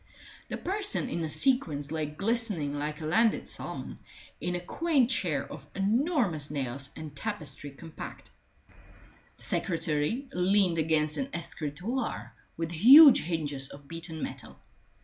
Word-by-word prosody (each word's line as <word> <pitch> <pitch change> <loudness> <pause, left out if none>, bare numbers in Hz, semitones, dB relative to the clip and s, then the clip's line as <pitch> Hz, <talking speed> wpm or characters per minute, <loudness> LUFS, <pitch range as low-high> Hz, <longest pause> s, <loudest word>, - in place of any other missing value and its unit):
The - - -3
person 405 -7 -1
in 170 - -3
the 160 - -2
sequins 155 - +2
lay 155 -1 -2
glistening 195 -3 -1
like 150 +2 -4
a - - -4
landed 220 +8 +2
salmon - - -6 0.4
in 180 0 -2
a - - -2
quaint 265 - +1
chair 175 - 0
of 145 -1 -11
enormous 205 - +1
nails 140 -1 -3
and 155 -2 -8
tapestry 150 -7 -4
compact. 155 +3 -10 1.1
The - - -13
secretary 165 - -1
leaned 180 -1 +2
against 155 -1 +1
an 270 0 -2
escritoire 175 - -4 0.2
with 165 0 -3
huge 265 - +9
hinges 145 -5 -2
of 140 0 -13
beaten 165 -1 -5
metal. 130 -4 -7
165 Hz, 130 wpm, -29 LUFS, 150-225 Hz, 1.1 s, huge